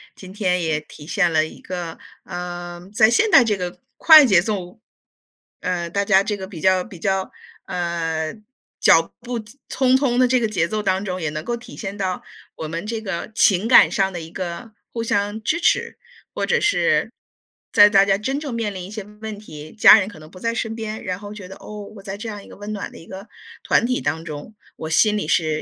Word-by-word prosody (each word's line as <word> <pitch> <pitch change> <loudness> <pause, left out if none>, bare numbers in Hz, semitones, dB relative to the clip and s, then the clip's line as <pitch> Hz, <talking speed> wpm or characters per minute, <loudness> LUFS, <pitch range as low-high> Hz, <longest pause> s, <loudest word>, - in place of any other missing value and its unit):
今 185 -1 -11
天 185 -3 0
也 160 -2 0
体 150 -1 -14
现 180 -1 +1
了 155 0 +4
一 - - -13
个， 175 -3 -6 0.3
呃， 175 0 -7
在 220 +1 +5
现 425 - +2
代 275 -7 +8
这 215 -3 0
个 180 -1 -5 0.2
快 315 -2 +9
节 190 -6 +5
奏， 195 -1 -4 0.8
呃， 175 -2 -2
大 200 +3 -1
家 195 -1 +5
这 205 0 -2
个 190 - -7
比 180 -5 -9
较， 185 -1 +3
比 185 -6 -12
较， 190 0 -1 0.3
呃， 165 -2 -2 0.4
脚 165 0 +5
步 240 0 -4
匆 255 +3 -1
匆 255 -3 +1
的 255 - +5
这 255 +1 +3
个 230 - +1
节 180 -6 0
奏 215 +3 -3
当 190 0 0
中， 185 -2 -4
也 160 -4 -2
能 155 0 -5
够 235 +6 -2
体 235 - -12
现 200 -1 -6
到 185 -2 -2 0.3
我 160 - -6
们 165 +4 -5
这 225 +1 -3
个 195 0 -5
情 205 -2 +3
感 250 - +7
上 195 -1 0
的 175 - -5
一 160 - -9
个 185 +5 -6 0.2
互 230 - -4
相 205 0 -1
支 315 +10 0
持。 - - +1 0.4
或 - - -1
者 480 - +2
是 415 -2 +2 0.6
在 205 0 +8
大 195 -1 +6
家 195 -1 +2
真 265 +7 -2
正 285 -5 -5
面 220 -3 -2
临 185 -2 -6
一 - - -10
些 215 0 -6 0.2
问 220 -2 -6
题， 155 -7 -11
家 220 0 +8
人 190 - -2
可 195 - -13
能 155 +1 -14
不 185 - -13
在 230 +4 -1
身 225 -1 -3
边， 220 -1 -5
然 185 0 -3
后 205 0 -9
觉 205 -3 -9
得， 190 - -10
哦， 210 -1 -9
我 200 - -11
在 195 0 -6
这 220 +3 -7
样 205 -2 -6
一 - - -15
个 - - -12
温 205 +1 -6
暖 205 - -5
的 - - -13
一 - - -13
个 190 +4 -10 0.4
团 - - +3
体 250 +1 -1
当 160 +3 -2
中， 155 +7 -8 0.2
我 160 - -6
心 210 +6 +3
里 210 - -2
是 155 -2 +1
195 Hz, 245 characters per minute, -21 LUFS, 175-220 Hz, 0.8 s, 快